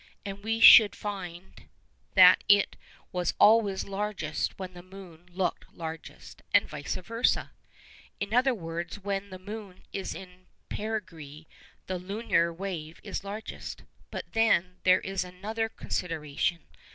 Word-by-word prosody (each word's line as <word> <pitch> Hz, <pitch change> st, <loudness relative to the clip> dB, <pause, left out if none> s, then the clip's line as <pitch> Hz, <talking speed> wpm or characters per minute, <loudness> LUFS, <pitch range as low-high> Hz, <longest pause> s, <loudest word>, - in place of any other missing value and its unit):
And 200 Hz, 0 st, -6 dB
we 225 Hz, +1 st, -1 dB
should 220 Hz, -1 st, +10 dB
find 190 Hz, -3 st, -7 dB, 0.5 s
that 185 Hz, -1 st, +8 dB
it 205 Hz, 0 st, +5 dB, 0.4 s
was 180 Hz, -1 st, -1 dB
always 210 Hz, -3 st, +5 dB
largest 195 Hz, -6 st, -3 dB
when 185 Hz, -1 st, -7 dB
the 175 Hz, -, -10 dB
moon 180 Hz, -2 st, -13 dB
looked 180 Hz, +1 st, -2 dB
largest, 160 Hz, -1 st, -8 dB
and -, -, +5 dB
vice 145 Hz, -, -4 dB
versâ. 230 Hz, +6 st, 0 dB, 0.7 s
In 200 Hz, +2 st, -3 dB
other 250 Hz, +1 st, +3 dB
words, 170 Hz, -1 st, -5 dB
when 200 Hz, 0 st, -3 dB
the 185 Hz, -, -8 dB
moon 200 Hz, 0 st, -9 dB
is 195 Hz, -, -4 dB
in 185 Hz, -1 st, -12 dB, 0.2 s
perigee 165 Hz, -9 st, -5 dB, 0.4 s
the 185 Hz, -1 st, -3 dB
lunar 185 Hz, -3 st, 0 dB
wave 165 Hz, -3 st, -6 dB
is -, -, -5 dB
largest. 205 Hz, +2 st, -7 dB, 0.3 s
But -, -, -7 dB
then 185 Hz, -5 st, +2 dB
there 185 Hz, 0 st, +5 dB
is 195 Hz, -1 st, -2 dB
another 210 Hz, +5 st, -4 dB
consideration. 165 Hz, -4 st, -2 dB
190 Hz, 130 wpm, -28 LUFS, 175-205 Hz, 0.7 s, should